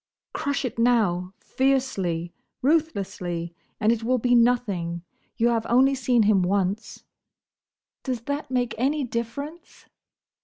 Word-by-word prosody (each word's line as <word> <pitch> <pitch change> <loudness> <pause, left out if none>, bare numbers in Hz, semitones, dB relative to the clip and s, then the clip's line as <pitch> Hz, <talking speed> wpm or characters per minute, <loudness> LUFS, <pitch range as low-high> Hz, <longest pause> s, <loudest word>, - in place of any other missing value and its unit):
"Crush 280 -2 -1
it 230 -2 -4
now! 205 -7 +2
Fiercely! 195 -11 -1 0.3
ruthlessly! 195 - -1 0.3
and 215 - +3
it 230 -1 0
will 255 +2 +2
be 245 +1 +1
nothing. 205 -9 +1 0.3
You 235 0 +3
have 230 -2 0
only 265 +3 +5
seen 250 -3 +2
him 205 -2 +4
once—" 195 +3 -1 1.0
"Does 255 -4 -3
that 285 +4 -4
make 245 -2 0
any 285 +4 +1
difference?" 250 +8 -6
235 Hz, 120 wpm, -25 LUFS, 195-260 Hz, 1.0 s, only